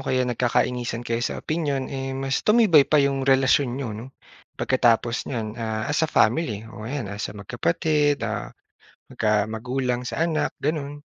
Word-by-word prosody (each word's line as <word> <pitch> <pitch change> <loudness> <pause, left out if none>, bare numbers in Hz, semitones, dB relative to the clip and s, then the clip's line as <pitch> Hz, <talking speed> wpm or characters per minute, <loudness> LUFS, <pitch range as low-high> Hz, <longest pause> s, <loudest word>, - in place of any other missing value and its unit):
kaya 130 -1 +1
nagkakainisan 120 0 -1
kayo 115 0 -1
sa 120 - -2
opinyon, 145 -5 -2
eh, 135 0 -4
mas 135 0 -1
tumibay 210 -10 +5
pa 155 - +4
yung 140 -1 +2
relasyon 135 0 +4
n'yo 130 -5 -4
'no, 110 +4 -7 0.5
pagkatapos 120 -2 +1
niyan, 115 -5 -3
ah, 110 -1 -2
as 145 - +1
a 160 - +1
family 110 -5 +1
o 110 0 -8
yan 140 -2 -3
as 100 - -4
magkapatid, 145 - +1
ah, 110 -2 -3 0.6
magka 105 -1 +1
magulang 125 +3 -2
sa 125 - -4
anak 155 -3 0
ganun. 145 -1 -3
130 Hz, 155 wpm, -24 LUFS, 115-145 Hz, 0.6 s, tumibay